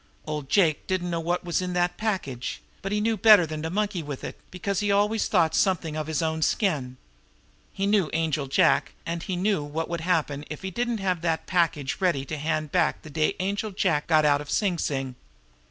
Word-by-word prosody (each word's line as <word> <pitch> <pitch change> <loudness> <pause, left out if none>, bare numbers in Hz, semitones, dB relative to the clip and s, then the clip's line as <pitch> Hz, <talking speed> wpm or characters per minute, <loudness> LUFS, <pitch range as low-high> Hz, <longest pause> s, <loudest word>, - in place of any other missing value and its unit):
Old 150 -3 -4
Jake 160 -4 +2
didn't 180 -2 -1
know 170 - -1
what 175 +2 -1
was 175 +1 0
in 180 0 -3
that 175 0 +1
package; 185 - -3 0.2
but 195 - -4
he 210 - +1
knew 225 +1 +1
better 210 -3 +7
than 155 -1 -5
to 160 - -3
monkey 205 0 -1
with 145 -3 -7
it, - - -5
because 190 +1 -2
he 205 -1 +1
always 205 +2 +2
thought 165 -5 +2
something 175 -5 +1
of 155 -1 -3
his 160 +1 -1
own 160 0 -1
skin. 150 - 0 0.7
He 195 - -2
knew 200 -6 +2
Angel 155 -3 0
Jack, 165 +5 +3
and 170 0 -3
he 185 0 -3
knew 195 -1 +1
what 155 +3 -4
would 170 -1 -3
happen 160 -5 0
if 155 - -7
he 190 - -3
didn't 240 +4 -1
have 185 -4 -1
that 165 -2 -1
package 165 -7 0
ready 170 -8 +1
to 155 - -4
hand 155 0 -1
back 180 -2 +1
the 155 - -10
day 155 +6 +1
Angel 200 +3 -1
Jack 180 -6 0
got 155 -2 +4
out 145 -1 +3
of 150 - -10
Sing 185 -1 +1
Sing. 135 -3 -2
170 Hz, 215 wpm, -26 LUFS, 155-195 Hz, 0.7 s, better